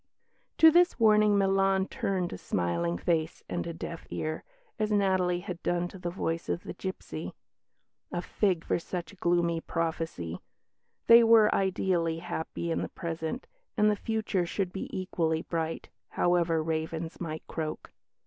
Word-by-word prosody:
To 320 0 +8
this 350 -1 +4
warning 215 -2 +5
Milan 195 0 +3
turned 185 -3 -2
a - - -5
smiling 85 -1 -1
face 160 - -1
and - - -3
a - - -3
deaf 165 0 -7
ear, 155 0 -3 0.4
as 215 0 0
Natalie 185 -3 +2
had 180 -2 -6
done 175 0 0
to 190 - -11
the 175 -1 -3
voice 165 -2 -3
of 175 - -1
the - - -6
gipsy. 190 0 -6 0.8
A - - -2
fig 185 -6 0
for - - +1
such 175 +3 -6
gloomy 170 -1 +1
prophecy! 160 - -3 0.6
They 235 0 +9
were 225 -2 +6
ideally 180 -3 +1
happy 165 0 -4
in - - 0
the - - -3
present, 165 - -4 0.3
and 210 0 +5
the - - +1
future 210 -4 -1
should 185 0 -2
be 190 - -5
equally 165 -4 -1
bright, 165 -1 -3 0.2
however 170 -2 +2
ravens 160 +1 -3
might 160 -2 -5
croak. 155 -1 -5
175 Hz, 150 wpm, -29 LUFS, 165-195 Hz, 0.8 s, They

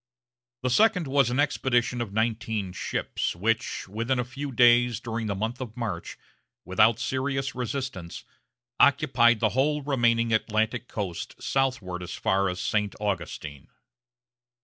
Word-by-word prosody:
The 125 - 0
second 200 - +4
was 135 -2 +2
an 125 +3 -1
expedition 125 -4 +1
of 115 -4 -4
nineteen 110 -3 -1
ships, - - -2
which, 110 +4 -1
within 115 +6 -1
a 125 - +1
few 135 +3 -6
days 120 -2 +5
during 115 -2 -4
the 100 - -1
month 115 +6 -3
of 115 -3 -7
March, 105 -8 -4 0.5
without 105 +5 +4
serious 135 +3 -2
resistance, 125 -8 -5 0.6
occupied 125 -5 +4
the 110 - +3
whole 145 +5 +1
remaining 115 -4 +2
Atlantic 110 +2 0
coast 95 -6 -5
southward 120 -10 -1
as 90 0 -6
far 95 0 +1
as 90 0 -4
St. 105 +2 -1
Augustine. 85 -8 -4
115 Hz, 135 wpm, -26 LUFS, 105-130 Hz, 0.6 s, days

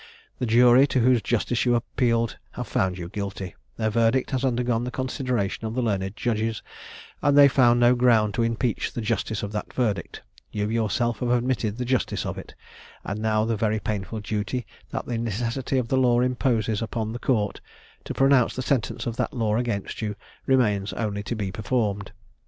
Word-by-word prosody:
The 125 - -1
jury, 120 +4 +6
to 130 - +1
whose 125 -1 +4
justice 120 +1 0
you 120 -1 +3
appealed, 115 0 0
have - - -4
found 95 -1 0
you 85 -2 -5
guilty; 100 -1 -5 0.2
their 110 -1 0
verdict 115 +5 +2
has 130 -1 -1
undergone 120 -2 +1
the 125 - -3
consideration 125 -5 -2
of 110 - -5
the 130 - 0
learned 100 -3 -1
judges, 115 -2 -1 0.6
and 145 -1 +3
they 140 -1 +9
found 120 -3 +4
no 120 +1 +6
ground 115 -4 +3
to 120 - 0
impeach 115 0 0
the 120 - -3
justice 110 0 -2
of 100 - -4
that 105 -1 -4
verdict; 105 -9 -2 0.3
you 105 -1 -1
yourself 115 +1 0
have 125 - -1
admitted 120 -3 0
the 125 - -2
justice 130 0 0
of - - -4
it; - - -12 0.5
and 100 +2 -4
now 110 0 +2
the 115 0 0
very 110 0 0
painful 105 +1 -4
duty 105 +4 -3 0.2
that - - -4
the 120 -2 -2
necessity 120 +4 -2
of 120 -3 -1
the 130 - +2
law 120 -2 +4
imposes 120 -4 +1
upon 110 0 -3
the 120 - -5
court, 105 -7 0 0.4
to - - -6
pronounce 135 -3 +4
the 130 - -3
sentence 130 -3 -1
of 115 0 -3
that - - -1
law 110 -3 +1
against 115 -4 -2
you, 105 -2 -2 0.3
remains 105 -7 +2
only 105 -3 -2
to 115 - -4
be 100 -3 -3
performed. 100 -1 -1
115 Hz, 190 wpm, -25 LUFS, 105-125 Hz, 0.6 s, they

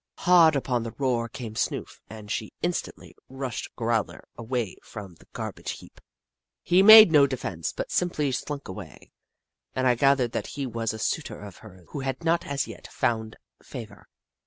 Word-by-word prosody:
Hard 170 -4 +5
upon 125 -3 0
the 115 0 -6
roar 120 -4 0
came 115 -3 -7
Snoof, 110 - -3
and 110 -2 -9
she 110 - -3
instantly 175 0 -4
rushed 130 -2 -5
Growler 115 -2 -2
away 120 -3 -3
from 100 -4 -10
the - - -21
gar - - -4
bage - - -6
heap. - - -16 0.6
He 180 +2 +4
made 215 -2 +10
no 145 -3 +6
defence, 100 - -4
but - - -5
simply 155 -6 0
slunk 140 +2 -4
away, 95 -4 -10 0.6
and 130 - 0
I 125 - +5
gathered 130 -1 +3
that - - -3
he 140 - -2
was 115 -2 -2
a 110 - -6
suitor 145 +7 -3
of 100 -3 -10
hers 95 -5 -15
who 145 - -6
had 135 +3 -4
not 170 +1 +1
as 140 0 -1
yet - - -10
found 110 -1 -2 0.3
fa - - -7
vour. - - -18
125 Hz, 180 wpm, -26 LUFS, 110-140 Hz, 0.6 s, made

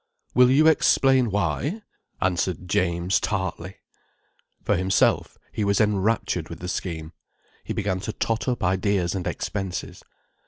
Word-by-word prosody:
"Will 125 0 +6
you 145 +4 +5
explain 135 -5 +4
why?" 105 - -1 0.4
answered 90 0 -1
James 90 -2 +1
tartly. 95 -2 -3 0.9
For - - +2
himself, 95 +1 +1
he 110 - -2
was 100 -1 +2
enraptured 105 -5 0
with 85 - -7
the 90 - -6
scheme. 85 -3 -4 0.5
He - - -4
began 100 -3 -1
to 110 +3 -4
tot 115 +2 -2
up 125 -1 -1
ideas 95 -1 +1
and 95 -3 -3
expenses. 95 -3 -4
95 Hz, 130 wpm, -24 LUFS, 90-110 Hz, 0.9 s, Will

